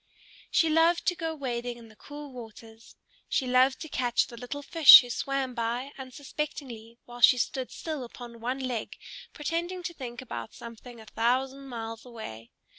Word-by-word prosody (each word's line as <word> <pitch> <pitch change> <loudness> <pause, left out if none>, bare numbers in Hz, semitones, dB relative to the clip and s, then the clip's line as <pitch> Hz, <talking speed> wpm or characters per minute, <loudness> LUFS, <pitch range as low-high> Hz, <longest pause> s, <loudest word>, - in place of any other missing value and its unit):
She 330 - +3
loved 330 +2 +3
to 355 - +2
go 325 -2 -3
wading 245 -4 -4
in 230 -1 -13
the 215 - -18
cool 290 +3 -10
waters; 225 -1 -12 0.3
she 265 - +1
loved 255 +1 +3
to 315 - -5
catch 245 -5 +1
the 235 - -11
little 250 +5 -6
fish 320 -1 +10
who 245 -1 -7
swam 275 0 -2
by 240 +3 -2
unsuspectingly 260 -3 -6
while 240 0 -11
she 250 - +8
stood 255 +1 -2
still 310 -5 -5
upon 240 -1 -10
one 250 +3 -2
leg 250 -4 -4 0.3
pretending 345 +4 -3
to 340 - -4
think 240 -6 -7
about 250 -3 -7
something 235 +1 -11
a 220 - -12
thousand 260 +5 -1
miles 225 -2 -6
away. 220 - -9
255 Hz, 170 wpm, -28 LUFS, 235-285 Hz, 0.3 s, fish